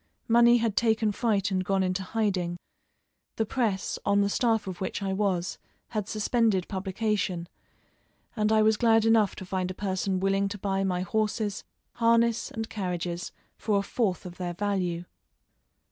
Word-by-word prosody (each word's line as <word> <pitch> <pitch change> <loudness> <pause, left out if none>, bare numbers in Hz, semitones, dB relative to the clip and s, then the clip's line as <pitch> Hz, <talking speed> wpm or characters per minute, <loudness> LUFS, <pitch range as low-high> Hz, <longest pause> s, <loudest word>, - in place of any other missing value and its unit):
Money 235 +1 +6
had 225 -3 0
taken 220 -2 +2
fright 205 -3 0
and 185 -1 0
gone 195 0 +1
into 185 +1 -1
hiding; 190 -4 -1 0.8
the 220 - 0
Presse, 215 -5 -1
on 200 0 +3
the 200 - +2
staff 225 -1 +1
of 185 -2 -6
which 190 - -2
I 195 -1 -1
was, 190 -3 -1 0.3
had 210 -3 -3
suspended 215 -3 +1
publication, 190 -2 -2 0.9
and 215 -1 +1
I 215 0 +5
was 215 0 +4
glad 225 -1 +4
enough 225 -3 +4
to 190 - -8
find 185 0 -2
a 185 - -5
person 190 -1 -1
willing 195 +1 +1
to 205 +1 -5
buy 195 0 -1
my 180 -2 0
horses, 215 +1 -1 0.3
harness, 230 0 +2
and 225 0 -4
carriages 175 -4 -3 0.3
for 210 -2 +1
a 200 - +1
fourth 200 -4 -1
of 180 -1 -8
their 175 -1 -4
value. 180 -3 -1
200 Hz, 160 wpm, -27 LUFS, 185-220 Hz, 0.9 s, Money